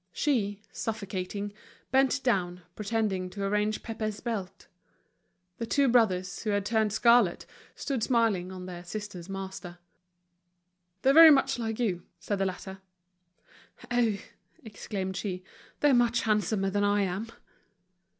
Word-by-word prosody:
She, 205 - 0
suffocating, 205 -1 -4 0.4
bent 265 +1 +3
down, 180 -7 0
pretending 210 -4 -1
to 200 +2 -6
arrange 210 +2 0
Pépé's 215 -2 -4
belt. 200 -5 -5 0.9
The 230 - -3
two 280 +2 +3
brothers, 195 -6 +2
who 220 - -3
had 205 -1 0
turned 220 -1 +1
scarlet, 235 -3 +4 0.3
stood 270 -6 -3
smiling 220 -7 +1
on 185 -1 -8
their 175 -1 -8
sister's 195 -2 -7
master. 190 -2 -7 1.3
"They're 270 - +5
very 325 +1 +10
much 270 -3 +3
like 225 -1 -3
you," 195 -8 -1 0.2
said 200 +4 -3
the 195 - +1
latter. 190 +1 -7 1.1
"Oh!" 235 -4 +2 0.5
exclaimed 195 -3 -5
she, 185 -2 -4 0.4
"they're 290 -2 +5
much 240 -1 +3
handsomer 210 -2 +1
than 205 +1 +1
I 205 0 +3
am!" 195 +4 -3
210 Hz, 130 wpm, -28 LUFS, 190-230 Hz, 1.3 s, very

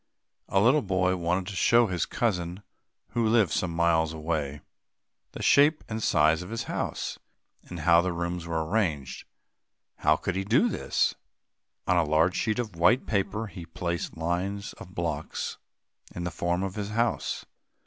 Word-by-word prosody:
A 95 - +3
little 125 +9 +5
boy 95 -3 +1
wanted 90 +1 -1
to 100 +1 -6
show 120 +5 +5
his 90 -5 -1
cousin, 90 -4 -2 0.5
who 120 - 0
lived 110 -4 +3
some 90 - 0
miles 85 -1 +2
away; 75 -3 -3 0.7
the - - -6
shape 150 +2 +5
and 110 0 -4
size 80 -2 +3
of 90 - -8
his 115 +1 -3
house, - - -3 0.5
and 90 -2 -7
how 85 +1 +5
the 90 +1 -1
rooms 85 0 -3
were 80 -1 -1
arranged. 80 - -1 0.7
How 75 - +3
could 90 +3 -3
he 95 - -1
do 125 - +3
this? - - 0 0.7
On 90 - +2
a 85 - +4
large 80 +4 +2
sheet 110 0 0
of 110 -7 -3
white 110 +10 +3
paper, 105 +1 -1
he 95 -4 -9
placed 85 +1 -4
lines 90 +5 -2
of 90 - -12
blocks 80 -3 -3 0.6
in 90 - -4
the 90 - -2
form 85 +2 -1
of 95 -1 -3
his 105 -1 -4
house. 115 +1 -1
90 Hz, 165 wpm, -27 LUFS, 85-105 Hz, 0.7 s, little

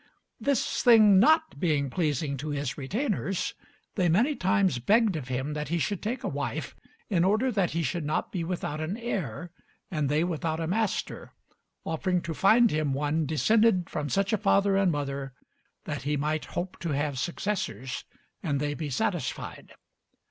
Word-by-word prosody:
This 280 -4 0
thing 215 -5 +7
not 315 +8 +3
being 150 -6 +1
pleasing 150 -3 -1
to 150 +4 -5
his 145 -3 -2
retainers, 195 - -2 0.4
they 180 -4 +1
many 240 - +3
times 190 - +2
begged 210 - +3
of 140 -5 -5
him 130 +3 -2
that 150 -1 -3
he 170 +4 0
should 195 +3 -1
take 235 +5 -3
a - - -1
wife, - - -4 0.4
in 175 -3 +3
order 215 +7 +2
that 195 -6 +1
he 170 - +1
should 160 +4 -2
not 150 +1 -1
be 180 -3 -2
without 165 -3 -3
an 170 +7 -3
heir 175 - -4 0.4
and 150 -5 0
they 150 +3 +2
without 165 -2 -2
a 165 - -1
master, 210 +4 -2 0.5
offering 180 +3 0
to 165 - -4
find 220 +7 +5
him 150 -2 0
one 150 +2 0
descended 185 - +3
from 150 -1 -3
such 195 +2 +1
a 215 - +2
father 200 +1 +3
and 195 -2 +3
mother 140 -2 -3 0.5
that - - -4
he 145 +2 -1
might 150 +2 -1
hope 180 +1 -3
to 170 -3 -2
have 145 -2 -1
successors 175 -6 -3 0.4
and 145 -6 -1
they 145 0 -1
be 150 0 -4
satisfied. 130 - -3
170 Hz, 170 wpm, -28 LUFS, 145-200 Hz, 0.5 s, thing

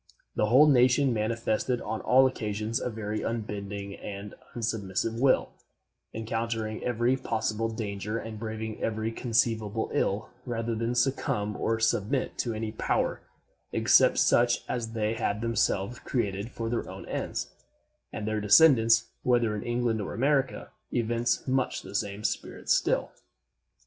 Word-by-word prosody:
The 105 - +2
whole 130 +7 +7
nation 130 -1 +4
manifested 115 +2 0
on 110 - -4
all 130 +1 +5
occasions 110 -2 -1
a - - -2
very 110 -1 -4
unbending 100 -3 -4
and 100 0 -7 0.2
unsubmissive 110 -1 -2
will, 130 0 +3 0.6
encountering 115 0 -3
every 120 +1 +1
possible 115 -2 -1
danger 105 -1 -4
and 110 -2 -6
braving 110 0 -5
every 110 0 -1
conceivable 115 -2 0
ill 100 +3 0
rather 115 -2 -2
than 115 +2 -1
succumb 120 -5 0
or 115 0 0
submit 110 +4 0
to 115 -3 -1
any 110 0 -3
power 110 - -1 0.5
except - - +5
such 120 0 +3
as 115 -2 -3
they 110 -1 0
had 105 -2 -1
themselves 115 -1 0
created 105 -3 -2
for 115 -1 -5
their 115 +1 -2
own - - -8
ends; - - -3 0.6
and 105 - -5
their 110 -1 -1
descendants, 115 0 +6
whether 120 -3 +2
in 105 - -4
England 120 -2 0
or 100 - -5
America, 135 +2 0 0.2
evince 120 +1 0
much 130 0 0
the - - -10
same 100 +1 -2
spirit - - -3
still. - - +2
115 Hz, 140 wpm, -28 LUFS, 105-120 Hz, 0.6 s, whole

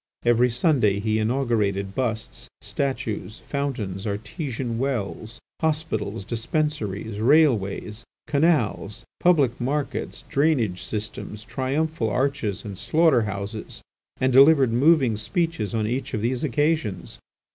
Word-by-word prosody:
Every 120 +1 +4
Sunday 120 - +2
he 110 +1 0
inaugurated 110 -5 0
busts, 115 -3 -3
statues, 115 -7 -3
fountains, 115 -9 -3
artesian 115 - -4
wells, 120 -3 -3 0.2
hospitals, 115 - -1
dispensaries, 110 -4 -2
railways, 115 -5 +2 0.2
canals, 140 - +1
public 140 -9 +3
markets, 140 +3 -2
drainage 130 - +1
systems, 105 0 -5
triumphal 135 -1 -1
arches, 125 -4 -1
and 100 -3 -7
slaughter 155 -4 +3
houses, 100 +1 -5 0.4
and 130 0 +2
delivered 135 -2 +6
moving 130 -3 +4
speeches 155 - -1
on 110 -1 0
each 125 +3 -2
of 105 - -2
these 125 +3 0
occasions. 145 - -1
120 Hz, 105 wpm, -24 LUFS, 105-140 Hz, 0.4 s, delivered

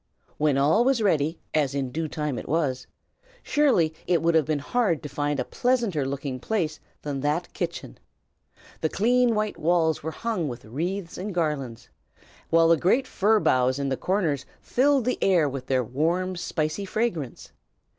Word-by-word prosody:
When 150 -2 +2
all 155 +12 +4
was 265 -1 +2
ready, 160 -4 +1 0.2
as 140 -3 +1
in 135 -2 -2
due 160 +4 -2
time 150 -4 -3
it - - -9
was, 135 -5 0 0.6
surely 250 - +2
it 175 -1 +3
would 170 0 +3
have 160 -3 +4
been 155 -1 +1
hard 170 - 0
to 150 - -5
find 145 -1 -1
a 125 - -1
pleasanter 230 - 0
looking 135 -1 -4
place 160 - -2 0.2
than 145 -2 -3
that 150 +5 -1
kitchen. 170 -1 -5 0.8
The 160 - 0
clean 240 +4 +2
white 215 0 -1
walls 160 -1 +2
were 160 - -3
hung 195 -1 -2
with 120 -2 -7
wreaths 170 - -4
and 195 0 -5
garlands, 145 -8 -2 0.6
while 165 0 +5
the 165 - +5
great 235 - +2
fir 215 -1 +2
boughs 130 -6 +2
in 140 -1 -1
the 135 - 0
corners 165 -5 0 0.2
filled 270 -1 +2
the 250 - 0
air 175 -6 +4
with 135 -2 -5
their 130 -1 +2
warm, 170 +10 -1
spicy 160 +2 -2
fragrance. 185 - -3
160 Hz, 170 wpm, -25 LUFS, 140-195 Hz, 0.8 s, while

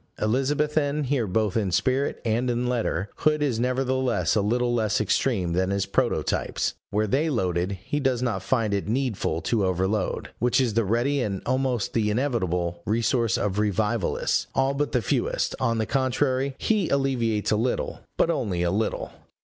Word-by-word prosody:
Elizabethan 145 +5 +1
here 130 -4 0
both 105 +1 0
in 105 -5 0
spirit 130 +9 +1
and 120 +3 +1
in 120 0 0
letter, 110 -6 -1
Hood 150 -1 +2
is 125 -6 0
nevertheless 130 0 +1
a 105 - +3
little 120 +4 +1
less 110 -3 +1
extreme 100 -4 +1
than 95 +2 +1
his 100 0 0
prototypes. 100 - 0 0.2
Where 105 +1 +1
they 140 +10 +1
loaded, 90 - 0
he 145 - -2
does 130 -3 0
not 110 -7 -1
find 110 +1 0
it 100 0 -1
needful 110 -9 -1
to 110 -4 0
overload, 95 +2 -1
which 125 +2 +2
is 125 -4 +1
the 115 0 +2
ready 120 +7 +1
and 100 -5 -3
almost 130 -3 0
the 110 -2 +1
inevitable 95 - -1
resource 115 0 +1
of 105 0 -1
revivalists, 105 0 0
all 135 +1 +2
but 145 +1 -1
the 125 -3 +1
fewest: - - 0
on 115 0 +1
the 110 - 0
contrary, 130 +1 0
he 210 -6 +1
alleviates 120 -6 0
a - - +4
little, 120 +4 -1 0.2
but 170 - +3
only 95 - -1
a 85 - +1
little. 110 +4 -1
115 Hz, 170 wpm, -25 LUFS, 100-130 Hz, 0.2 s, a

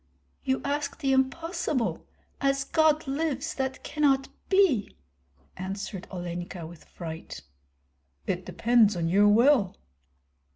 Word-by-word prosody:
"You 265 0 0
ask 285 0 -2
the 270 -4 +1
impossible. 290 0 -1 0.3
As 275 0 +2
God 310 +1 +2
lives, 285 +1 -2
that 265 -1 -3
cannot 280 -2 +1 0.2
be!" 375 - +3 0.6
answered 190 0 -5
Olenka, 175 -1 -5
with 165 0 -12
fright. 160 - -8 0.8
"It - - -2
depends 230 -3 +3
on 165 -1 0
your 200 +4 +5
will." 225 -1 +4
265 Hz, 110 wpm, -27 LUFS, 190-285 Hz, 0.8 s, your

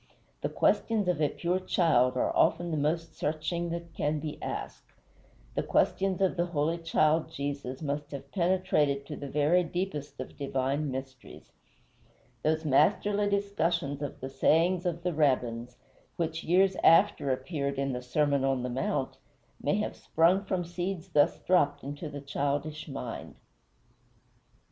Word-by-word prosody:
The - - -1
questions 220 -4 +1
of 175 -4 +1
a 150 - +3
pure 180 +2 -1
child 130 -9 +2
are - - 0
often 175 -1 +2
the - - 0
most 160 +3 -1
searching 160 +3 -2
that 170 0 -5
can 150 0 0
be 150 0 -6
asked; - - -6 0.6
the - - 0
questions 190 -1 +1
of 190 -1 +2
the 175 +1 +1
holy 165 0 0
child 160 -1 +2
Jesus 140 -2 -4
must 145 0 -3
have 140 -1 -8
penetrated 170 -6 +1
to 150 - -6
the 145 - -6
very 150 +6 +3
deepest 160 -6 -4
of 130 - -7
divine 140 +1 -1
mysteries. 130 -1 -8 0.9
Those 160 +1 0
masterly 205 +8 +3
discussions 170 -8 0
of 145 - -5
the 130 - -4
sayings 175 +6 +2
of 170 -1 -3
the 180 -1 0
Rabbins, 125 -5 0 0.4
which 165 -1 -2
years 190 +2 +3
after 165 -4 +5
appeared 140 +1 -2
in 135 -1 -1
the 125 - -3
Sermon 140 +2 +1
on 135 -2 +1
the 125 - -2
Mount, 130 +1 -2 0.4
may 145 - +1
have 210 - -2
sprung 180 +5 +2
from 185 -2 -1
seeds 175 +1 -4
thus 145 -4 +3
dropped 145 -6 +2
into 145 +3 -6
the 145 -1 -7
childish 145 +2 -2
mind. 130 -5 -6
155 Hz, 150 wpm, -29 LUFS, 140-175 Hz, 0.9 s, after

